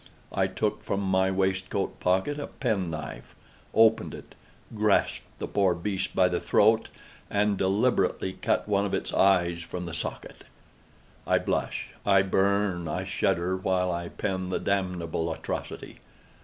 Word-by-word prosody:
I - - +1
took - - -2
from 100 - -1
my 95 -1 +2
waistcoat 95 0 -1
pocket 95 +11 +1
a 145 - -4
pen 105 -9 -1
knife, 80 -3 -7 0.4
opened 110 0 +4
it, - - -12 0.4
grasped 105 -1 +1
the - - -4
poor 95 -3 +2
beast 95 +2 -3
by 90 - +5
the 90 -1 -1
throat, 110 +2 +3 0.4
and 105 0 +2
deliberately 95 -1 +1
cut - - 0
one 100 -1 +2
of 100 - -1
its - - -3
eyes 90 -3 +3
from 90 +1 -6
the 85 - -6
socket! 80 - -5 0.8
I - - +4
blush, - - -2
I 100 -1 +5
burn, 95 -2 +1
I 75 - -2
shudder, 90 +2 0
while 95 -1 0
I 85 0 -3
pen 95 -2 -3
the 95 - 0
damnable 90 -4 -1
atrocity. 80 - -5
95 Hz, 145 wpm, -27 LUFS, 90-100 Hz, 0.8 s, by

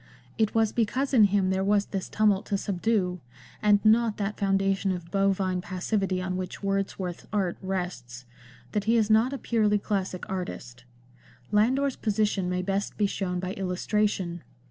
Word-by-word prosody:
It 220 -1 +1
was 220 -1 +3
because 255 +5 0
in 225 -5 +7
him 195 -1 +2
there 190 0 0
was 200 0 +2
this 190 -2 -4
tumult 210 -2 +2
to 200 - 0
subdue 190 -2 0 0.2
— 120 0 -22
and 210 0 +3
not 220 0 +4
that 205 0 -2
foundation 195 0 +1
of 175 -2 -5
bovine 195 -2 +1
passivity 185 +1 -1
on 185 0 -2
which 185 +2 -6
Wordsworth's 195 -2 -2
art 195 -4 0
rests— 175 -11 -4 0.5
that 205 -1 -1
he 230 +2 +3
is 220 -1 +2
not 225 +4 +4
a 275 - -3
purely 215 -5 +2
classic 195 -3 -3
artist. 135 -11 -6 0.7
Landor's 260 +6 +2
position 210 -4 0
may 180 0 -1
best 195 +1 -2
be 210 - +2
shown 185 -2 -2
by 185 +1 -3
illustration. 185 -1 -1
195 Hz, 165 wpm, -27 LUFS, 185-210 Hz, 0.7 s, in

